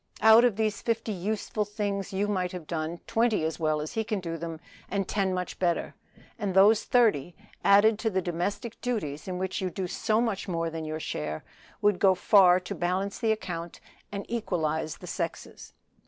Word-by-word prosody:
Out 220 Hz, +2 st, +8 dB
of 240 Hz, -5 st, +3 dB
these 215 Hz, 0 st, -1 dB
fifty 215 Hz, -4 st, -2 dB
things 205 Hz, -2 st, -3 dB
you 200 Hz, +2 st, 0 dB
might 185 Hz, -3 st, -1 dB
have 180 Hz, -3 st, -6 dB
done 165 Hz, +1 st, -4 dB
twenty 230 Hz, -5 st, +1 dB
as 160 Hz, 0 st, -2 dB
well 155 Hz, -1 st, +1 dB
as 150 Hz, +1 st, -5 dB
he 225 Hz, -, 0 dB
can 215 Hz, -2 st, -2 dB
do 165 Hz, -2 st, -4 dB
them, 165 Hz, -1 st, -6 dB, 0.3 s
and 195 Hz, -2 st, -1 dB
ten 195 Hz, -2 st, 0 dB
much 180 Hz, -1 st, -4 dB
better; 175 Hz, -2 st, 0 dB, 0.5 s
and 200 Hz, -4 st, -2 dB
those 205 Hz, +3 st, +6 dB
thirty, 205 Hz, -, +2 dB, 0.3 s
added 205 Hz, +2 st, +5 dB
to 225 Hz, -, 0 dB
the 190 Hz, -3 st, 0 dB
domestic 185 Hz, +6 st, -3 dB
duties 175 Hz, -13 st, -3 dB
in 185 Hz, -1 st, -3 dB
which 190 Hz, +1 st, -2 dB
you 185 Hz, -, -1 dB
do 185 Hz, +1 st, -4 dB
so 215 Hz, +4 st, 0 dB
much 225 Hz, -5 st, -1 dB
more 165 Hz, -2 st, -1 dB
than 160 Hz, -1 st, -5 dB
your 155 Hz, 0 st, -4 dB
share, 75 Hz, -, -4 dB, 0.4 s
would 205 Hz, -3 st, +3 dB
go 190 Hz, -2 st, +5 dB
far 185 Hz, -2 st, +6 dB
to 180 Hz, -, -5 dB
balance 185 Hz, +3 st, -2 dB
the 225 Hz, -2 st, +2 dB
account 175 Hz, -6 st, -4 dB, 0.3 s
and 200 Hz, -1 st, -5 dB
equalize 160 Hz, -9 st, -2 dB
the -, -, -11 dB
sexes." -, -, -5 dB
190 Hz, 185 wpm, -28 LUFS, 170-215 Hz, 0.5 s, Out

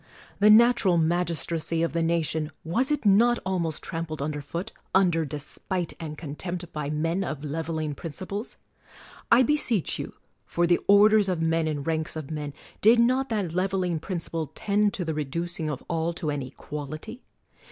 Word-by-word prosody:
The 210 Hz, +1 st, +6 dB
natural 220 Hz, -5 st, +6 dB
magistracy 165 Hz, -1 st, 0 dB
of 170 Hz, -, -1 dB
the 165 Hz, -, +1 dB
nation, 160 Hz, -2 st, 0 dB
was 245 Hz, -, 0 dB
it 295 Hz, -, 0 dB
not 230 Hz, +4 st, +5 dB
almost 175 Hz, -5 st, -1 dB
trampled 165 Hz, -2 st, -4 dB
under 145 Hz, +1 st, -3 dB
foot, 170 Hz, +9 st, -5 dB, 0.2 s
under 175 Hz, -4 st, +3 dB
despite 155 Hz, +5 st, -4 dB
and 155 Hz, -2 st, -6 dB
contempt, 175 Hz, +3 st, -6 dB
by 150 Hz, -2 st, -3 dB
men 165 Hz, +5 st, 0 dB
of 155 Hz, -5 st, -5 dB
leveling 155 Hz, 0 st, -3 dB
principles? 185 Hz, -, -6 dB, 0.7 s
I 240 Hz, +2 st, +7 dB
beseech 245 Hz, -, +1 dB
you, -, -, -5 dB, 0.3 s
for 175 Hz, -, +1 dB
the 175 Hz, 0 st, +3 dB
orders 205 Hz, 0 st, +6 dB
of 180 Hz, -3 st, 0 dB
men 165 Hz, 0 st, +1 dB
and 145 Hz, -2 st, -3 dB
ranks 160 Hz, -1 st, 0 dB
of 155 Hz, -2 st, -6 dB
men, 150 Hz, -2 st, -4 dB, 0.3 s
did 225 Hz, +3 st, +6 dB
not 255 Hz, +3 st, +3 dB
that 200 Hz, -7 st, -1 dB
leveling 185 Hz, -2 st, 0 dB
principle 165 Hz, -3 st, -4 dB
tend 205 Hz, 0 st, +2 dB
to 180 Hz, -, -2 dB
the 160 Hz, -, -1 dB
reducing 160 Hz, +2 st, -3 dB
of 145 Hz, -3 st, -5 dB
all 165 Hz, 0 st, -1 dB
to 160 Hz, -3 st, -2 dB
an 145 Hz, -1 st, -2 dB
equality? 150 Hz, -, -7 dB
170 Hz, 165 wpm, -26 LUFS, 155-195 Hz, 0.7 s, I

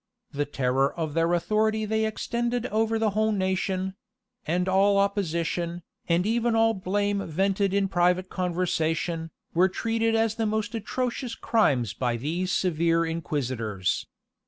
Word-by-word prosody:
The 145 Hz, +1 st, -1 dB
terror 135 Hz, -1 st, +1 dB
of 160 Hz, -3 st, -3 dB
their 165 Hz, +1 st, +2 dB
authority 215 Hz, +4 st, +1 dB
they 220 Hz, +1 st, +1 dB
extended 235 Hz, +2 st, -2 dB
over 225 Hz, +1 st, +1 dB
the 220 Hz, -1 st, +1 dB
whole 215 Hz, +2 st, +1 dB
nation; 190 Hz, -1 st, -1 dB, 0.5 s
and 180 Hz, +3 st, 0 dB
all 195 Hz, +2 st, +4 dB
opposition, 175 Hz, -3 st, -1 dB, 0.3 s
and 170 Hz, +2 st, +3 dB
even 230 Hz, +1 st, +1 dB
all 225 Hz, 0 st, +4 dB
blame 200 Hz, +1 st, -1 dB
vented 195 Hz, +4 st, +1 dB
in 200 Hz, 0 st, +2 dB
private 180 Hz, 0 st, +2 dB
conversation, 170 Hz, -2 st, -1 dB, 0.2 s
were 180 Hz, +3 st, +4 dB
treated 225 Hz, +3 st, 0 dB
as 225 Hz, -1 st, +2 dB
the 225 Hz, -1 st, -1 dB
most 215 Hz, 0 st, -1 dB
atrocious 240 Hz, +2 st, -3 dB
crimes 135 Hz, -, +1 dB
by 120 Hz, -2 st, -1 dB
these 170 Hz, +9 st, -2 dB
severe 165 Hz, -1 st, +2 dB
inquisitors. 130 Hz, -, -2 dB
190 Hz, 135 wpm, -26 LUFS, 165-220 Hz, 0.5 s, all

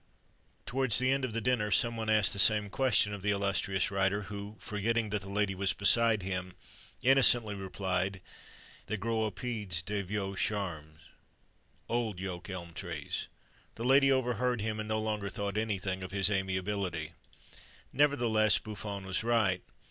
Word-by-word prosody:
Towards 130 Hz, -3 st, +4 dB
the 130 Hz, +2 st, +4 dB
end 135 Hz, 0 st, 0 dB
of 130 Hz, -, -2 dB
the 115 Hz, +1 st, -2 dB
dinner, 120 Hz, -3 st, +1 dB
some 115 Hz, +3 st, +3 dB
one 110 Hz, -1 st, -3 dB
asked 110 Hz, -2 st, +5 dB
the 100 Hz, -, -1 dB
same 105 Hz, 0 st, +5 dB
question 120 Hz, -5 st, +3 dB
of 100 Hz, -, -6 dB
the 100 Hz, -, -1 dB
illustrious 100 Hz, -1 st, 0 dB
writer, 100 Hz, +1 st, +1 dB
who, 100 Hz, +1 st, -8 dB
forgetting 110 Hz, +1 st, -1 dB
that 105 Hz, -1 st, -1 dB
the 95 Hz, -, -9 dB
lady 100 Hz, 0 st, 0 dB
was 95 Hz, +1 st, 0 dB
beside 110 Hz, 0 st, +2 dB
him, 90 Hz, -1 st, -4 dB, 0.5 s
innocently 125 Hz, -4 st, +5 dB
replied: 95 Hz, -1 st, -2 dB, 0.7 s
"They 110 Hz, -, -2 dB
grow 115 Hz, +2 st, -1 dB
aux -, -, 0 dB
pieds 100 Hz, -4 st, -4 dB
des 100 Hz, +2 st, -2 dB
vieux 100 Hz, 0 st, -4 dB
charmes" 80 Hz, -7 st, -3 dB, 0.9 s
(old 115 Hz, -5 st, -1 dB
yoke 90 Hz, -1 st, -6 dB
elm 85 Hz, -3 st, -7 dB
trees). -, -, -4 dB, 0.5 s
The 115 Hz, -, -5 dB
lady 135 Hz, +1 st, +5 dB
overheard 125 Hz, -1 st, 0 dB
him, 110 Hz, +1 st, -3 dB
and 110 Hz, 0 st, -5 dB
no 110 Hz, -, 0 dB
longer 105 Hz, -2 st, -2 dB
thought 100 Hz, 0 st, -3 dB
anything 95 Hz, -3 st, -2 dB
of 95 Hz, -, -6 dB
his 100 Hz, +1 st, +1 dB
amiability. 95 Hz, -4 st, -2 dB, 0.8 s
Nevertheless 120 Hz, -7 st, +3 dB
Buffon 100 Hz, -2 st, -6 dB
was 95 Hz, +2 st, -1 dB
right. 110 Hz, -6 st, +2 dB
105 Hz, 160 wpm, -31 LUFS, 95-115 Hz, 0.9 s, asked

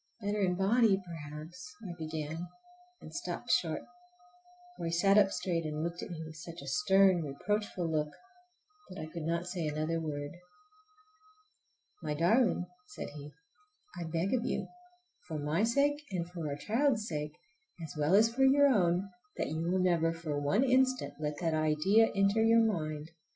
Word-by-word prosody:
"Better 205 Hz, -1 st, -1 dB
in 180 Hz, -2 st, +2 dB
body 200 Hz, +1 st, +4 dB
perhaps"—I 170 Hz, +4 st, -8 dB
began, 160 Hz, +1 st, -4 dB, 0.5 s
and -, -, -11 dB
stopped -, -, -4 dB
short, -, -, +1 dB, 0.9 s
for -, -, -5 dB
he -, -, -2 dB
sat 195 Hz, +4 st, +4 dB
up 205 Hz, -2 st, +6 dB
straight 180 Hz, -3 st, -1 dB
and 155 Hz, 0 st, -3 dB
looked 170 Hz, +1 st, -3 dB
at -, -, -6 dB
me 165 Hz, -2 st, -6 dB
with 155 Hz, 0 st, -10 dB
such 170 Hz, +1 st, -9 dB
a -, -, -10 dB
stern, 185 Hz, +4 st, +4 dB
reproachful 185 Hz, +5 st, -2 dB
look 155 Hz, -2 st, 0 dB, 0.8 s
that 185 Hz, -, -9 dB
I 155 Hz, -, -4 dB
could 165 Hz, +2 st, -7 dB
not 170 Hz, +2 st, -1 dB
say 180 Hz, -3 st, -3 dB
another 155 Hz, +2 st, -1 dB
word. 145 Hz, -2 st, -4 dB, 1.7 s
"My 150 Hz, -2 st, -2 dB
darling," 180 Hz, -, +3 dB, 0.2 s
said -, -, -7 dB
he, 145 Hz, 0 st, -9 dB, 0.6 s
"I 175 Hz, -1 st, -4 dB
beg 165 Hz, +5 st, -1 dB
of 245 Hz, -3 st, +1 dB
you, -, -, -1 dB, 0.6 s
for 160 Hz, -, -4 dB
my 150 Hz, +5 st, 0 dB
sake 280 Hz, +5 st, +2 dB
and 175 Hz, -4 st, -2 dB
for 170 Hz, -3 st, -5 dB
our 140 Hz, -, -2 dB
child's 220 Hz, -, +1 dB
sake, 150 Hz, -1 st, -4 dB, 0.5 s
as 160 Hz, -, -7 dB
well 150 Hz, +4 st, +3 dB
as 225 Hz, +3 st, +5 dB
for 265 Hz, +2 st, +2 dB
your 280 Hz, +1 st, +6 dB
own, 185 Hz, -5 st, +2 dB, 0.3 s
that -, -, -1 dB
you 160 Hz, +1 st, -2 dB
will 175 Hz, +3 st, +1 dB
never 170 Hz, -3 st, +2 dB
for 165 Hz, -3 st, -4 dB
one 195 Hz, -, +2 dB
instant 260 Hz, 0 st, +2 dB
let 150 Hz, -1 st, -2 dB
that 165 Hz, -2 st, +1 dB
idea 155 Hz, +8 st, +3 dB
enter 200 Hz, +2 st, +3 dB
your 230 Hz, +1 st, +6 dB
mind! 155 Hz, -7 st, -2 dB
170 Hz, 165 wpm, -32 LUFS, 155-200 Hz, 1.7 s, up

